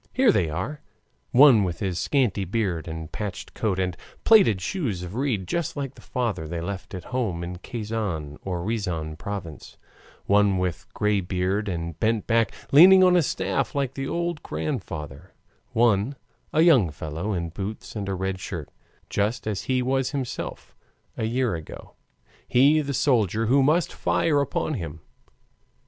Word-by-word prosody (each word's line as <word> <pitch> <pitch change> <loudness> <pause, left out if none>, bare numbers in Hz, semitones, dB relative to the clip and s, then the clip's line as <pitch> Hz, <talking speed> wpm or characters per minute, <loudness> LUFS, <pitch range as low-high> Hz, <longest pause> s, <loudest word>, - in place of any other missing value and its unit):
Here 255 -3 +5
they 85 - +1
are 95 - -4 0.5
one 125 -5 +7
with 90 -3 -2
his 95 -4 -2
scanty 120 -9 +1
beard 95 -4 -2
and 80 -1 -6
patched 105 -4 -5
coat 105 -5 -1
and 90 -2 -1 0.3
plaited 195 - +6
shoes 105 - -2
of 90 +1 -7
reed, 115 -7 -1
just 170 - -2
like 135 -2 -3
the - - -16
father 115 -10 -2
left 90 +3 -5
at 90 - -6
home 100 -10 -1
in 90 +1 -5
Kazan 105 -11 -4
or 90 -3 -3
Riazan 90 -8 -2
province; 100 -7 -7 0.5
one 100 -1 +4
with 90 -2 -2
gray 105 -1 +2
beard 95 +3 -1
and 85 -2 -4
bent 110 -1 +1
back, 115 -2 +2 0.2
leaning 185 +6 +9
on 180 -1 +6
a 175 - +5
staff 145 - -1
like 135 -2 -1
the 135 0 -4
old 170 -1 -2
grandfather; 85 - -5 0.4
one, 115 +2 +2 0.4
a 155 - +3
young 140 - +5
fellow 80 +7 -4
in 85 -2 -2
boots 100 +7 -6
and 100 -2 -3
a 95 - -1
red 95 0 -2
shirt, 85 -5 -6 0.4
just 105 +4 -1
as 100 -5 -3
he 130 -1 +1
was 135 +1 +1
himself 135 -4 -5 0.4
a 110 - -2
year 120 -1 0
ago 80 -2 -8 0.5
he, 145 +5 +5
the 140 -2 -3
soldier 115 -6 +2
who 135 +5 +4
must 155 +5 +2
fire 145 -3 +1
upon 140 +2 -1
him. 80 - -5
105 Hz, 160 wpm, -25 LUFS, 90-130 Hz, 0.5 s, leaning